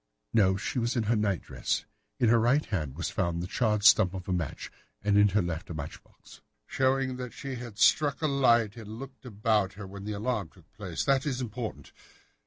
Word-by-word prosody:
"No, 95 -4 +4
she 110 - -2
was 120 +2 0
in 120 - +1
her 115 +2 +1
night 100 -5 0
dress. - - -2 0.3
In 120 - +4
her 115 0 +5
right 125 +6 +3
hand 75 - -3
was 85 - -3
found 85 -4 -1
the 85 - -3
charred 105 +1 0
stump 100 -3 +6
of 90 -1 -7
a 95 - 0
match, 85 -5 -4 0.3
and 105 0 +2
in 105 0 +6
her 105 0 +1
left 85 -1 -4
a 85 - -5
match 70 -2 -7
box." - - -18 0.2
"Showing 130 -1 0
that 125 -3 -6
she 135 -1 -6
had 120 -4 -8
struck 140 +5 +4
a - - +4
light 120 -6 +3
and 110 -1 -8
looked 135 0 -10
about 105 -3 +1
her 100 0 -8
when 100 +1 -9
the 105 +1 -4
alarm 105 -3 -2
took - - -23
place. - - -4
That 135 +1 +2
is 130 -3 -1
important. 120 -2 -5
110 Hz, 215 wpm, -29 LUFS, 100-125 Hz, 0.3 s, stump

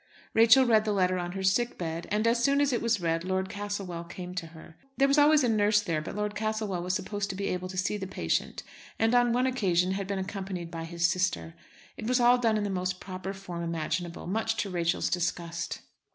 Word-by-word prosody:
Rachel 230 +4 +7
read 220 -3 +4
the 215 -1 0
letter 185 -2 +2
on 175 0 -4
her 190 0 -4
sick 235 +6 +1
bed, 165 -1 -4
and 210 +2 0
as 235 +1 +2
soon 280 +2 +3
as 285 -2 +2
it 240 - 0
was 230 -2 +1
read 165 -1 0
Lord 190 +1 -1
Castlewell 200 -4 -4
came 180 +1 -8
to 180 -2 -4
her. 160 0 -14 0.2
There 275 - +4
was 280 +2 +4
always 295 0 +6
a - - +3
nurse 210 -2 +3
there, 165 -7 -1
but 155 - -7
Lord 210 0 -2
Castlewell 215 -3 -2
was 180 +1 -1
supposed 205 +1 -3
to 195 - -4
be 195 +1 -2
able 180 0 -3
to 185 - -7
see 185 +3 0
the 190 -2 -5
patient, 85 - -2 0.3
and 225 +1 +2
on 245 -1 +4
one 250 +2 +2
occasion 190 -8 +1
had 195 0 -3
been 200 0 -2
accompanied 190 -3 -5
by 165 -1 -5
his 170 0 -1
sister. 170 - 0 0.4
It - - -5
was 250 +1 +2
all 245 +1 +5
done 225 -3 +2
in 210 - -1
the 205 - -2
most 185 0 -2
proper 185 0 -6
form 190 -3 -7
imaginable, 170 +1 -3
much 220 +4 -1
to 200 - -6
Rachel's 175 -1 0
disgust. 170 -1 -2
190 Hz, 230 wpm, -28 LUFS, 175-220 Hz, 0.4 s, Rachel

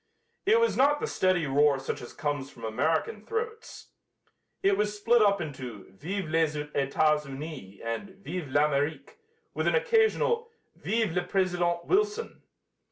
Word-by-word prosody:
It 450 +3 +6
was 465 - +2
not 290 +3 +4
the - - -1
steady 185 -3 +1
roar 140 0 +3
such 135 - -4
as 120 - -9
comes 145 -2 -3
from 115 - -15
American 160 - 0
throats. 450 - -5 0.7
It 390 0 +4
was 210 - -1
split 230 +3 +4
up 200 -1 +4
into 130 - -7
"Vive 180 - -4
les 160 -1 +1
Etats 150 +1 +1
Unis!" 135 -9 -8
and 185 - -4
"Vive 180 -5 -4
l'Amérique!" 145 +1 0 0.4
with - - -1
an - - +3
occasional 465 0 +2 0.3
"Vive 225 -4 0
le 180 +2 0
President 175 -2 0
Wilson!" 425 +3 0
170 Hz, 145 wpm, -28 LUFS, 145-230 Hz, 0.7 s, It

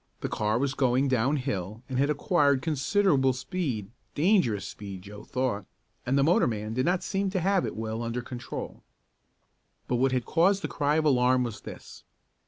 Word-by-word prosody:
The - - -2
car 105 +1 0
was 135 +2 0
going 130 +1 +2
down 130 +3 +2
hill 110 -4 -4
and 130 -1 -2
had 140 +2 +2
acquired 145 -2 +2
considerable 150 -2 +2
speed 130 - -3 0.2
dangerous 150 - +2
speed 100 -3 -8
Joe 105 +1 -10
thought 125 -6 -2 0.4
and 135 +3 +2
the 140 - +4
motorman 115 - +1
did 130 +5 0
not 180 0 +1
seem 195 0 -1
to 190 0 -1
have 190 +1 +2
it - - -5
well 110 +1 -3
under 115 +1 -3
control. 125 0 -7 1.1
But 125 - 0
what 130 +2 +2
had 125 -2 0
caused 190 +4 +2
the - - 0
cry 145 0 0
of 155 0 +1
alarm 125 -2 +4
was 115 -3 -5
this. - - -11
130 Hz, 180 wpm, -28 LUFS, 115-155 Hz, 1.1 s, the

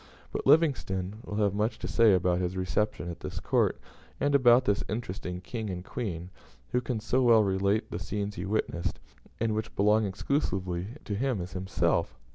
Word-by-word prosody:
But - - -3
Livingstone 115 - +2
will 105 - -6
have 105 -2 +2
much 105 +3 0
to - - -5
say 115 -4 +5
about 90 0 +2
his 90 0 -2
reception 105 +1 -1
at 85 - -9
this - - -5
court, - - +1 0.4
and 145 0 +1
about 125 -2 +6
this 100 0 +1
interesting 95 -5 -4
King 110 +2 -5
and 90 -1 -5
Queen; 90 -9 -4
and 90 - -10 0.4
who 125 - +2
can 125 -2 -2
so 120 +4 +1
well 115 -3 +6
relate 100 +2 +1
the - - -3
scenes 105 0 -3
he 90 -1 -5
witnessed, 90 -4 -1 0.4
and 115 -1 +1
which 110 +1 -3
belong 105 +2 +4
exclusively 95 - -1 0.2
to 105 - -3
him, 125 +1 0
as 90 +1 -6
he 90 - -3
himself? 95 0 0
105 Hz, 190 wpm, -29 LUFS, 95-115 Hz, 0.4 s, about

